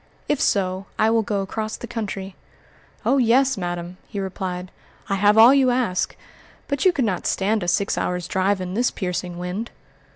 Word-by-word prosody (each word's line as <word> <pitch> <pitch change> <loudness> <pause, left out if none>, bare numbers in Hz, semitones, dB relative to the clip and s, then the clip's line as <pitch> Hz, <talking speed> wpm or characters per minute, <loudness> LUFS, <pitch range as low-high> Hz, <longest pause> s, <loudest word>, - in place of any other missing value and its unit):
If 295 - 0
so, 190 -1 0
I 220 +1 +3
will 225 0 +3
go 205 -2 -1
across 215 +2 -4
the - - -7
country." 200 -5 -5 0.7
"Oh, 275 - +3
yes, 260 +3 +4
madam!" 175 -1 -4
he 200 - -5
replied, 185 -1 -4 0.4
"I - - +1
have 205 +2 +4
all 230 +4 +9
you 270 -2 +4
ask; 245 -7 0 0.5
but 280 -2 -1
you 370 - +7
could 280 -8 0
not 190 -5 -1
stand 210 +2 +1
a 175 - -3
six 200 +3 +1
hours' 180 -1 -2
drive 195 +1 +1
in 185 0 -4
this 240 +4 +2
piercing 180 -2 -4
wind." 180 +6 -4
200 Hz, 185 wpm, -23 LUFS, 185-230 Hz, 0.7 s, all